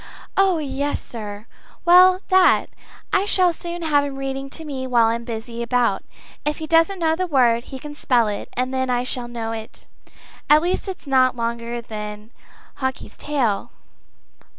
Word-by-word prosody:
"Oh 385 -3 +3
yes, 285 -1 -2
sir 210 -2 -8 0.4
well 365 +2 +7
that! 375 -1 +4 0.4
I 385 - +3
shall 365 -4 +3
soon 345 +1 -6
have 290 -3 +3
him 280 -1 -4
reading 270 0 -4
to 320 +3 -8
me 265 -3 -4
while 240 -2 +4
I'm 230 +1 0
busy 230 0 -6
about. 235 -4 +1 0.4
If 300 0 -1
he 315 - -5
doesn't 330 +5 +3
know 320 -2 +1
the 370 +2 -2
word, 245 -6 +3
he 265 - -8
can 295 +3 -8
spell 245 -6 +2
it, 205 -1 -4
and 255 +1 -2
then 260 0 -1
I 245 0 +1
shall 250 -1 -1
know 230 -2 -4
it 220 -1 -8 0.6
at 300 +2 +6
least 360 +3 -1
if 380 - -3
it's - - -20
not 260 -2 +3
longer 235 0 -3
than 210 -1 -7 0.5
Hawkie's 260 -1 -4
tail." 250 -9 -1
260 Hz, 175 wpm, -22 LUFS, 235-315 Hz, 0.6 s, well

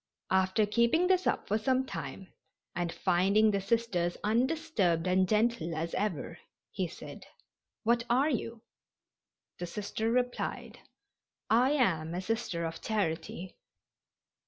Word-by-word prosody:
After 190 +3 +3
keeping 235 - +3
this 370 0 +2
up - - 0
for 215 +2 +1
some 260 +3 +1
time 190 -6 -7 0.4
and 175 -1 -2
finding 200 +7 +3
the 200 -1 0
Sisters 195 -5 0
undisturbed 225 - +1
and 185 0 +2
gentle 215 -7 +1
as 165 +2 -3
ever, 175 -4 -2 0.3
he 185 -3 -2
said, 165 - -10 0.6
"What 235 +1 +2
are 265 +6 +3
you?" 230 -2 -3 1.0
The 175 - -4
Sister 210 +4 -3
replied: 245 +1 -2 0.7
"I 250 +5 +4
am 170 - +1
a 180 - -2
Sister 215 -5 -2
of 165 0 -5
Charity." 180 -3 -2
210 Hz, 125 wpm, -31 LUFS, 175-235 Hz, 1.0 s, I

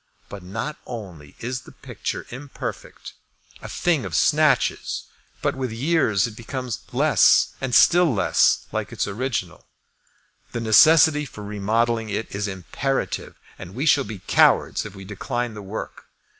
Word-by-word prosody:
But 100 - -8
not 115 +11 -5
only 90 - -9
is 125 +2 -4
the - - -15
picture - - -6
imperfect, 135 +3 -8 0.5
a - - -8
thing 165 -7 0
of - - -5
snatches, 150 -5 +2 0.4
but - - 0
with 130 -3 -3
years 115 - +1
it 115 - -7
becomes 125 +1 -5
less - - +4
and 130 -2 -1
still 175 -2 +6
less 95 -6 +2
like - - -3
its - - -2
original. 100 -5 -4 0.9
The - - -2
necessity 150 +7 +6
for 105 -6 -10
remodelling 110 +2 -1
it 105 +2 -4
is 100 +1 -2
imperative, 100 +8 -3 0.2
and 95 +1 -10
we 135 +5 -2
shall 145 -2 +4
be 100 -5 -9
cowards - - +3
if 105 - -13
we 95 0 -10
decline 120 +4 -4
the 105 - -8
work. 100 +3 -7
115 Hz, 145 wpm, -23 LUFS, 100-135 Hz, 0.9 s, still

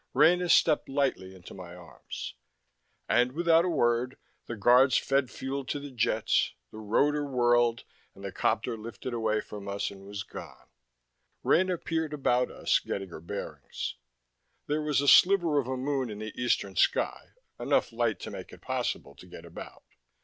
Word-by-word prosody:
Rena 180 +1 +4
stepped 155 -2 +4
lightly 135 -9 -1
into 90 -2 -12
my 90 -2 -10
arms. 90 -2 -8 0.7
And 125 +1 +2
without 170 +1 +4
a - - 0
word, 125 -4 +1 0.3
the 120 - -4
Guards 125 +5 +5
fed 135 -2 +1
fuel 135 +1 -4
to 145 - -3
the 145 0 -8
jets, 115 -3 +1 0.2
the - - -9
rotor 145 +8 +1
whirled, 120 -3 +2 0.3
and 100 - -13
the 100 - -4
copter 115 +4 0
lifted 115 +3 -7
away 110 -2 0
from 100 -1 -9
us 100 0 -2
and 100 -1 -12
was 100 0 -5
gone. - - -11 0.7
Rena 185 0 +3
peered 160 -2 -2
about 125 -3 +1
us, - - +1
getting 95 -1 -5
her 80 - -9
bearings. 100 +4 -6 0.7
There 150 +1 -1
was 150 -2 +1
a 145 - -1
sliver 175 -3 +6
of 130 - -3
a 130 0 -2
moon 135 -1 -1
in 105 - -6
the 110 0 -6
eastern 100 -5 0
sky, - - 0 0.3
enough - - +1
light - - 0
to - - -6
make - - -8
it - - -13
possible - - -3
to - - -15
get - - -11
about. - - -10
125 Hz, 170 wpm, -29 LUFS, 110-145 Hz, 0.7 s, sliver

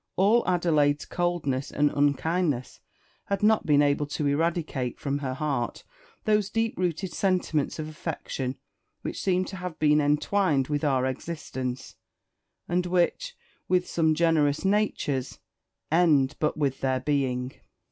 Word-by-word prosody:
All 215 +5 +4
Adelaide's 155 -5 +2
coldness 165 -7 -1
and 145 0 +2
unkindness 145 0 0 0.5
had 200 0 -2
not 220 0 +3
been 145 -1 +5
able 145 0 +1
to 145 +1 -3
eradicate 145 -4 -1
from 140 0 -2
her 130 -2 -3
heart 140 -5 -2 0.4
those 210 -2 +2
deep 225 +1 -1
rooted 180 0 -2
sentiments 180 -6 0
of 155 -1 -4
affection 145 -4 -4 0.5
which - - -4
seem 185 -1 +1
to 190 - -7
have 180 -3 -6
been 150 0 +4
entwined 150 0 +1
with 145 0 -1
our 135 -3 +2
existence, 130 -2 -5 0.7
and 180 +1 0
which, 185 - 0 0.3
with 180 -1 +2
some 160 -2 +2
generous 155 -2 +2
natures, 145 - 0 0.5
end 155 -5 +4
but 155 - 0
with 140 -3 -1
their 130 -1 +1
being. 130 -2 -1
150 Hz, 135 wpm, -27 LUFS, 140-180 Hz, 0.7 s, been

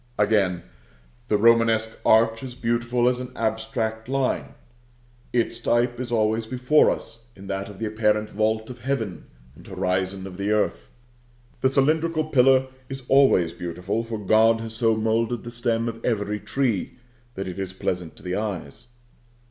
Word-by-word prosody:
Again: 100 -5 +2 0.6
the 105 - +2
Romanesque 115 0 +3
arch 115 0 +4
is 130 -2 -7
beautiful 120 0 0
as 125 0 +1
an 125 0 -6
abstract 110 0 -2
line. 135 -1 -1 0.8
Its 120 -1 0
type 120 +1 +1
is 125 -1 -5
always 110 0 +1
before 130 +5 +3
us 115 +1 -5
in 95 - -12
that 95 0 -4
of 100 - -11
the 110 - -3
apparent 105 0 +1
vault 110 +2 0
of 125 - -11
heaven, 115 -6 -3 0.3
and - - -16
horizon 95 +1 -2
of 90 -2 -9
the 100 +1 -2
earth. 80 -13 0 0.7
The 130 - +3
cylindrical 155 +4 +2
pillar 130 -3 +4 0.2
is 135 -1 -6
always 130 -12 +4
beautiful, 90 +6 -3
for 115 -1 -5
God 110 +2 +4
has 115 0 -6
so 115 -1 +2
moulded 115 +2 0
the 120 - -7
stem 120 -1 0
of 115 0 -6
every 105 -3 -1
tree 125 -2 -1 0.4
that 95 0 -4
it 90 +1 -6
is 95 -1 -3
pleasant 90 -3 -3
to - - -16
the 90 0 -2
eyes. 100 -4 -5
110 Hz, 160 wpm, -24 LUFS, 105-120 Hz, 0.8 s, arch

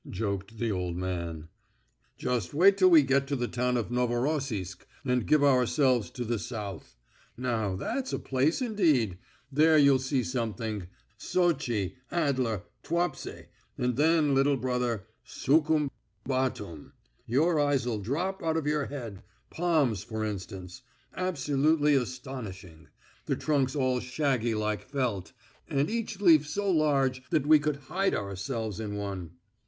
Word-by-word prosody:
joked 100 +1 -3
the 115 0 -1
old 90 -3 -2
man. 85 -3 -4 0.7
"Just 125 +2 -2
wait 195 +5 +6
till 185 -2 +5
we 160 -4 +7
get 135 +1 +2
to 140 - -1
the 120 -2 -1
town 125 +1 0
of 115 0 -3
Novorossisk, 120 - -1 0.2
and 125 -3 +1
give 150 -2 +4
ourselves 130 -2 +3
to 125 - -5
the 115 -1 -1
South. 100 - -6 0.4
Now, 115 -6 -1
that's 260 - -3
a - - -1
place 140 - 0
indeed; 155 - +2 0.3
there 155 +3 +5
you'll 140 -2 +6
see 130 0 0
something. 110 -6 -3 0.3
Sotchi, 120 - 0
Adler, 130 - 0 0.2
Tuapse, 170 +2 -2 0.3
and 125 -1 0
then, 155 0 +3
little 135 +1 +3
brother, 125 -4 -1 0.2
Sukhum, 150 0 +1 0.3
Batum.... 115 - -3 0.3
Your 155 +7 +2
eyes'll 130 -6 +1
drop 170 - -2
out 160 -1 0
of 160 - -2
your 150 -1 +1
head.... 115 -9 -7 0.3
Palms, 155 - +1
for 110 -1 -3
instance. 95 -3 -6 0.3
Absolutely 150 -3 +2
astonishing; 115 - -4 0.4
the - - +1
trunks 140 -3 0
all 130 -3 +1
shaggy 125 -3 0
like 105 0 -1
felt, 125 -9 -2 0.4
and 140 +7 0
each 225 -3 -3
leaf 160 -7 +5
so 200 +5 -1
large 140 -5 +2
that 155 -4 +1
we 155 0 +7
could 150 0 -1
hide 195 +5 0
ourselves 105 +2 -4
in 105 -2 -4
one." 95 -5 -5
130 Hz, 135 wpm, -29 LUFS, 110-150 Hz, 0.7 s, we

